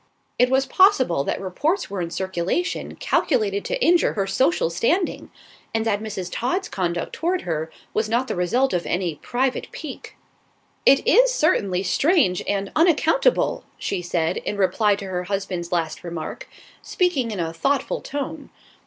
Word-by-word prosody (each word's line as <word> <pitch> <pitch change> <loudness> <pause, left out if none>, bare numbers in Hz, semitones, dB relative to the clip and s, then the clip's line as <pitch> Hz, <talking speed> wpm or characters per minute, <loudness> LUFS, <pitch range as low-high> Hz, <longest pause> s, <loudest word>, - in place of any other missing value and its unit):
It 250 0 +5
was 265 +1 +2
possible 265 - +4
that - - -2
reports 300 - -1
were 195 -2 -4
in 170 - -3
circulation 190 - -2
calculated 210 -8 0
to - - -2
injure 345 0 +4
her 200 -2 -1
social 195 - +1
standing, 325 - 0 0.5
and 225 0 0
that 210 -2 0
Mrs. 205 -4 -5
Todd's 360 +11 -1
conduct 175 -2 -2
toward 355 +2 -1
her 160 -1 -3 0.2
was 215 0 0
not 240 +3 +1
the - - -2
result 240 +10 +1
of 175 -1 -1
any 175 -2 -1
private 255 +1 -1
pique. 300 -5 -9 0.7
"It 275 +10 +5
is - - +6
certainly 200 - +1
strange 265 - +2
and 200 -1 -1
unaccountable," 340 +9 +3
she 190 - -3
said, 175 0 -1
in 205 - -4
reply 200 +2 +2
to 200 - -7
her 180 -1 -3
husband's 185 -3 -3
last 165 -3 -2
remark, 170 -2 -6 0.3
speaking 310 -10 0
in 210 -4 -4
a 165 -1 -2
thoughtful 275 +11 0
tone. 290 +1 -5
210 Hz, 155 wpm, -23 LUFS, 180-290 Hz, 0.7 s, is